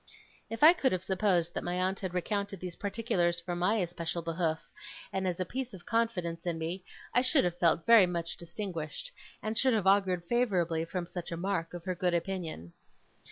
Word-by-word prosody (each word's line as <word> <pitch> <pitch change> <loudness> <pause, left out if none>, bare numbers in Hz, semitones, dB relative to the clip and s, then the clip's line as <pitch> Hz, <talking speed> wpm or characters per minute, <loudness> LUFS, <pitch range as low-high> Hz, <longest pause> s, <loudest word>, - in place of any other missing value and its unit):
If 225 +4 -3
I 320 +3 +10
could 275 -7 +1
have 185 -1 -1
supposed 185 -3 +1
that - - -3
my 175 0 -2
aunt 185 +1 0
had 185 -2 -4
recounted 200 +1 -2
these 180 -1 -6
particulars 195 -5 0
for 175 +1 -4
my 180 +5 +2
especial 170 -3 -2
behoof, 165 -1 0 0.6
and 190 -1 0
as 180 -1 -2
a 185 - 0
piece 255 +2 -4
of 175 - -14
confidence 190 -8 -1
in 170 -1 0
me, 170 +3 -4 0.3
I 245 - +5
should 265 +3 +3
have 175 0 -1
felt 165 -1 +3
very 230 -5 +8
much 170 -1 -2
distinguished, 170 - -5 0.3
and 215 +1 -2
should 255 +1 +3
have 210 -4 0
augured 190 -3 +3
favourably 175 -7 +1
from 175 +1 -3
such 175 0 -6
a 170 - -3
mark 175 -2 -2
of 175 0 -8
her 185 - 0
good 180 0 0
opinion. 165 - -4
180 Hz, 200 wpm, -31 LUFS, 170-205 Hz, 0.6 s, I